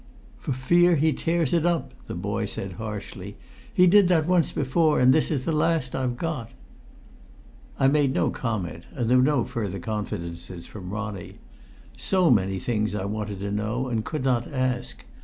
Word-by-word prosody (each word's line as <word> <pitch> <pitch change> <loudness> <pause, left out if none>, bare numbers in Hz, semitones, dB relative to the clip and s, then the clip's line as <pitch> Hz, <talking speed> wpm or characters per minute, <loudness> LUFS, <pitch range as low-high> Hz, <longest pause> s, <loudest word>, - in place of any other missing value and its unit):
"For - - -4
fear 175 +7 +4
he 155 +1 +2
tears 165 -3 0
it 170 -2 +3
up!" 175 -2 0
the - - -5
boy - - -2
said 95 - -5
harshly. 105 +2 -7 0.3
"He 180 - +5
did 195 +1 +6
that 165 -4 +3
once 175 -1 +2
before, 150 +3 +2
and 125 +1 +6
this 155 - +2
is 140 -5 -1
the - - 0
last 155 -4 +1
I've 125 -2 -1
got." 145 -7 -3 1.3
I 135 - +5
made 140 -1 +3
no - - +2
comment, 95 -9 -4
and 120 -5 -1
there 125 +2 +5
were 125 - +5
no 140 -3 +3
further 100 -6 -4
confidences 85 -4 -5
from 95 -4 -9
Ronnie. 105 -2 -5 0.6
So 185 -6 +3
many 95 -4 +2
things 105 +1 -1
I 95 - -2
wanted 105 -1 -4
to 100 0 -3
know 110 +5 -2
and 115 -3 -1
could 150 +1 -4
not 125 -1 0
ask! 125 -2 -2
125 Hz, 175 wpm, -25 LUFS, 105-155 Hz, 1.3 s, did